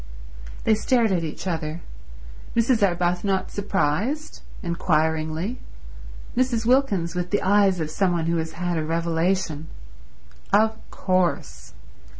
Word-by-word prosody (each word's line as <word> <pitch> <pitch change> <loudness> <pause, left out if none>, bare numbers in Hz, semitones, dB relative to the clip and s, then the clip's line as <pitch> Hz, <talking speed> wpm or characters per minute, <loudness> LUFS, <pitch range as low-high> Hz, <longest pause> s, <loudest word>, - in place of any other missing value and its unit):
They 220 - +4
stared 230 0 +2
at 175 -3 +1
each 160 +3 -5
other; 165 -2 -3 0.7
Mrs. 230 0 +3
Arbuthnot 180 +1 +1
surprised, 205 - -1 0.2
inquiringly, 160 +3 0 0.8
Mrs. 245 -3 +1
Wilkins 220 -10 +2
with 180 0 -2
the 205 - 0
eyes 195 -1 +4
of 155 -1 -3
some 185 +1 +1
one 165 -2 0
who 170 0 +1
has 160 0 -3
had 175 -1 -2
a - - -1
revelation. 165 0 0 0.8
Of 220 +2 +4
course. 175 - -1
180 Hz, 120 wpm, -24 LUFS, 165-205 Hz, 0.8 s, They